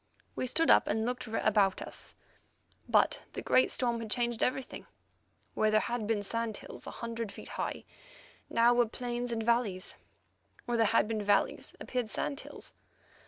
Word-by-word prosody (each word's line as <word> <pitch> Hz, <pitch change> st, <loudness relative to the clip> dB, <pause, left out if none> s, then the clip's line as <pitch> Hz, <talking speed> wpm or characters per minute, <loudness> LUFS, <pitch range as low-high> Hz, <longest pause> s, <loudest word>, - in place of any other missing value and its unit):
We 255 Hz, -, -1 dB
stood 325 Hz, +6 st, +3 dB
up -, -, +6 dB
and 220 Hz, +1 st, 0 dB
looked 250 Hz, +1 st, -3 dB
about 210 Hz, -3 st, +2 dB
us, -, -, -4 dB, 0.7 s
but -, -, +3 dB
the -, -, -4 dB
great 255 Hz, -, +4 dB
storm 240 Hz, -2 st, +1 dB
had 225 Hz, -1 st, -6 dB
changed 240 Hz, 0 st, 0 dB
everything. 255 Hz, +1 st, -2 dB, 0.7 s
Where 215 Hz, -, +2 dB
there 215 Hz, 0 st, +4 dB
had 235 Hz, -2 st, -2 dB
been 215 Hz, -2 st, 0 dB
sand 230 Hz, +1 st, -2 dB
hills -, -, -9 dB
a -, -, -7 dB
hundred 230 Hz, -2 st, -4 dB
feet -, -, -10 dB
high, -, -, -4 dB, 0.6 s
now 235 Hz, +1 st, +5 dB
were 240 Hz, -1 st, +3 dB
plains 245 Hz, +1 st, -3 dB
and 225 Hz, -1 st, -1 dB
valleys; 220 Hz, -5 st, 0 dB, 0.7 s
where 240 Hz, -1 st, 0 dB
there 225 Hz, -, +5 dB
had 225 Hz, 0 st, +3 dB
been 220 Hz, -1 st, -1 dB
valleys 205 Hz, 0 st, +1 dB
appeared 250 Hz, -4 st, -2 dB
sand 280 Hz, +5 st, -2 dB
hills. -, -, -8 dB
230 Hz, 165 wpm, -31 LUFS, 215-245 Hz, 0.7 s, up